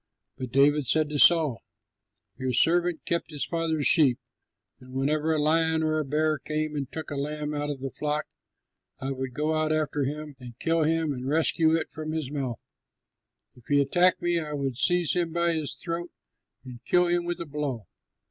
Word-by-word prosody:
But 130 -2 -6
David 140 +1 +3
said 155 -1 +2
to 150 -1 -2
Saul, 155 -8 +5 0.7
"Your 130 -1 -2
servant 170 +6 +2
kept 170 -1 -1
his 150 -3 -3
father's 165 -3 -1
sheep, 140 -7 +5 0.6
and 130 0 -14
whenever 150 +4 0
a 155 - +1
lion 160 +1 +2
or 155 0 +1
a - - 0
bear 155 +2 0
came 155 0 -3
and 140 -2 -4
took 160 -1 -6
a 145 - -2
lamb 150 +1 -3
out 145 0 -2
of 140 -3 -5
the 135 -1 -4
flock, 150 0 -2 0.7
I 135 +1 -3
would 130 -2 -5
go 150 +2 0
out 155 0 0
after 150 -2 0
him 150 +1 -5
and 120 -2 -11
kill 165 +2 +1
him 160 -1 +1
and 130 0 -6
rescue 160 +2 +3
it 165 - -2
from 155 0 -5
his 155 -4 -3
mouth. 135 -5 -4 0.9
If 125 - -20
he 145 -1 +3
attacked 175 +6 +3
me, 175 -1 +2
I 150 -2 -5
would 135 -3 -2
seize 175 +5 +2
him 170 -2 -1
by 170 0 +1
his 155 -3 -2
throat 175 0 -4 0.6
and 125 -2 -10
kill 180 0 +3
him 175 0 +1
with 175 0 -3
a 170 - -4
blow. 140 -7 -4
150 Hz, 195 wpm, -27 LUFS, 140-160 Hz, 0.9 s, Saul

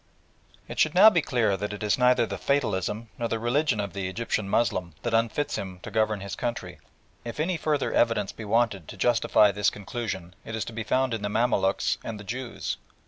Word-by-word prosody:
It - - -7
should - - +3
now 220 - +9
be 170 - +3
clear 115 -8 +1
that 105 +2 -4
it 105 - -6
is 105 - +2
neither 125 -1 +4
the - - -6
"fatalism" 110 -5 -1
nor 120 - 0
the 115 - -1
religion 120 +1 +1
of 100 -3 -3
the 95 -2 -3
Egyptian 110 0 -2
Moslem 95 -8 0
that 120 - -2
unfits 115 +6 +1
him 95 -2 -6
to - - -7
govern 110 -2 +1
his 100 0 -5
country. 120 -1 -4 0.4
If 120 +4 -7
any 170 +4 +1
further 155 -3 0
evidence 110 -4 +2
be 110 - -9
wanted 105 -5 +1
to - - -9
justify 110 -2 +4
this 105 0 +2
conclusion 100 -4 -5
it 115 - -6
is 110 - -2
to 115 - -7
be 115 - -4
found 130 +3 +1
in 110 - -2
the 105 - -2
Mamaluks 110 -3 +1
and 110 -2 -5
the - - -8
Jews. 120 +4 -4
110 Hz, 210 wpm, -26 LUFS, 100-120 Hz, 0.4 s, now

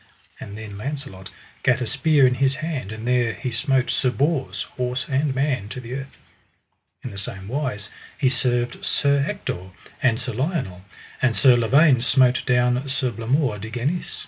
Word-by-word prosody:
And 100 +1 -8
then 105 -2 -8
Launcelot 130 -8 -6 0.3
gat 125 - +3
a 125 - -2
spear 140 +3 +3
in 125 - +4
his 135 0 +3
hand, 155 - -4
and 110 +2 -6
there 125 -2 +2
he 130 +2 -4
smote 130 +2 +1
Sir 130 - +2
Bors, 140 +1 -1
horse 125 0 -3
and 140 0 0
man, 135 -7 0
to 125 - -6
the 125 0 -7
earth. 135 +1 -7 0.9
In - - -5
the 100 - -6
same 100 -1 -5
wise 120 -5 -3 0.3
he 140 - +2
served 125 -1 0
Sir 140 -1 +2
Ector 95 - -5 0.3
and 120 -3 +2
Sir 125 -1 -3
Lionel; 130 - -2 0.4
and 125 -4 +2
Sir 130 -3 +6
Lavaine 130 +3 +4
smote 130 0 +3
down 125 +2 +2
Sir 130 -2 0
Blamore 115 +1 0
de 110 +3 -6
Ganis. 130 +10 -3
125 Hz, 170 wpm, -23 LUFS, 115-140 Hz, 0.9 s, Sir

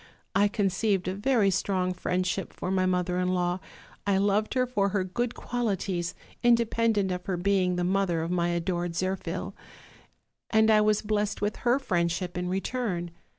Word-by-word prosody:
I 200 +2 +4
conceived 200 -1 0
a 185 - 0
very 205 -1 +2
strong 185 -1 0
friendship 185 +1 -2
for 185 - -4
my 185 -1 +2
mother 180 0 0
in 180 - +1
law;. 180 0 0 0.5
I 200 -1 +3
loved 205 +4 +1
her 255 -1 +3
for 205 -6 0
her 195 -1 0
good 235 +6 -2
qualities, 195 -7 -2 0.3
inde 235 -1 +4
pendent 220 -4 +1
of 180 0 -4
her 185 -2 -1
being 185 -1 +2
the 175 - -1
mother 180 -3 +1
of 165 - -3
my 175 -1 +1
adored 175 0 -1
Zirphil; 185 +1 -3 1.0
and 220 0 +4
I 215 -1 +6
was 210 0 +2
blessed 210 -1 -1
with 210 +1 -1
her 245 +1 +2
friendship 175 -7 -1
in 180 0 -2
return. 190 -3 -2
190 Hz, 170 wpm, -28 LUFS, 180-210 Hz, 1.0 s, I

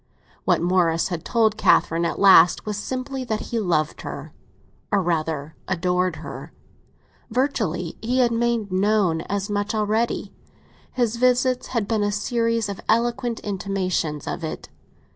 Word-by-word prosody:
What - - +2
Morris 175 -2 +2
had 175 -3 -4
told 220 -2 +2
Catherine 165 -4 +3
at 170 - -2
last 185 -4 +6
was 210 -1 -3
simply 260 +5 -4
that 220 -3 -2
he 235 - 0
loved 165 -7 0
her, - - -7 0.6
or 205 - +3
rather 160 -4 -2
adored 180 0 0
her. - - -8 0.8
Virtually, 215 - -1
he 240 +4 -1
had 245 -2 +3
made 230 -3 0
known 190 -3 +2
as 200 0 -1
much 205 +1 -2
already—his 225 +2 -3
visits 250 +1 +2
had 230 -5 -2
been 220 -2 0
a 205 0 +1
series 230 +1 0
of 200 -1 -6
eloquent 235 +1 +1
intimations 185 -6 -2
of 170 - -4
it. 160 - -5
205 Hz, 140 wpm, -23 LUFS, 180-235 Hz, 0.8 s, last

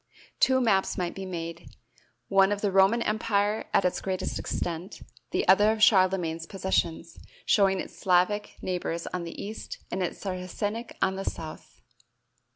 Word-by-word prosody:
Two 260 0 +4
maps 205 -6 +2
might 175 -1 -2
be 195 0 -6
made, 170 -2 -7 0.5
one 195 0 +4
of 205 0 -1
the 205 - +1
Roman 195 +5 +4
empire 210 0 0
at 195 - +3
its 180 - 0
greatest 190 -1 -3
extent, 175 +3 -4 0.3
the - - -1
other 205 +3 +6
of 220 -1 0
Charlemagne's 185 -6 +3
possessions, 170 -3 -2 0.3
showing 195 -2 +3
its - - -7
Slavic 190 +3 +1
neighbors 175 -2 -2
on 180 -1 -3
the 170 - -8
east 210 +2 -6
and 190 - -2
its 180 - -2
Saracenic 205 +4 -4
on 190 0 +1
the 195 - -3
south. 160 -1 -7
190 Hz, 155 wpm, -27 LUFS, 180-205 Hz, 0.5 s, other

